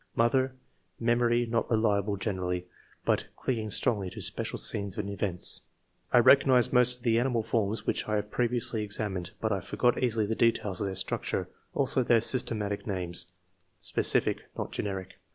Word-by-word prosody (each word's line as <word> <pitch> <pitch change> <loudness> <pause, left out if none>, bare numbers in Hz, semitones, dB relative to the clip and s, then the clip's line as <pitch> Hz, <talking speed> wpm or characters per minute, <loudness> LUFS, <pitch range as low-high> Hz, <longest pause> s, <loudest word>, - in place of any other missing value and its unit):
Mother 130 +3 +2 0.2
— 90 -1 -43
Memory 120 0 +2
not 115 0 -1
reliable 105 -3 +1
generally, 90 -3 -3 0.4
but - - +1
clinging 110 -4 -2
strongly 105 -3 +1
to - - -9
special - - -1
scenes 100 -2 -1
and 105 -2 -3
events.'* 100 -3 +2 0.5
2. - - +5
"I - - +9
recognize 130 -1 +5
most 125 0 +5
of 125 - -18
the 115 -1 +3
animal 120 -2 0
forms 110 -1 -1
which - - -1
I 105 - +1
have 105 0 -3
previously 120 -2 0
examined, 100 -4 -1
but 110 - -1
I 100 - 0
forget 120 +6 0
easily 115 -4 +1
the 110 - -1
details 105 -5 +1
of 100 - 0
their 95 - -4
structure, 95 - -2 0.3
also 130 - +2
their 120 -1 +4
systematic 105 -5 +1
names 90 -2 -2 0.5
(specific, - - +2 0.2
not - - -4
generic). 95 -2 -5
110 Hz, 170 wpm, -28 LUFS, 100-120 Hz, 0.5 s, I